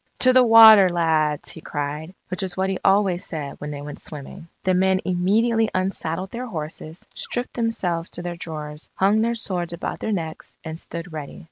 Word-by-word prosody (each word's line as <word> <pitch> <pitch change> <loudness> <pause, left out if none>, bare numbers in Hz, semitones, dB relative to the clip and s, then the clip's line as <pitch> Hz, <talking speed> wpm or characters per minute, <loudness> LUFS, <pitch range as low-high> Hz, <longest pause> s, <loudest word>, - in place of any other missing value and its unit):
"To 255 0 +6
the 255 - +7
water, 220 -4 +9
lads!" 160 -4 +1
he 160 - -10
cried, 150 +5 -5
which 185 -1 -3
was 190 -1 -4
what 190 0 0
he 190 - -3
always 195 -2 +3
said 145 -3 -6
when 150 - -5
they 145 -1 -6
went 145 0 -8
swimming. 150 +2 -9 0.2
The 185 - +2
men 190 +1 +3
immediately 215 +5 +2
unsaddled 185 -1 -2
their 250 +2 -5
horses, 155 -3 -7
stripped 245 0 -4
themselves 185 -8 -1
to 175 - -5
their 175 0 -4
drawers, 150 -2 -7
hung 205 +3 +3
their 235 +1 +1
swords 180 -6 -3
about 170 - -4
their 220 - -2
necks, 165 -5 -5
and 160 0 -6
stood 170 0 -7
ready. 150 -2 -7
175 Hz, 190 wpm, -23 LUFS, 160-200 Hz, 0.2 s, water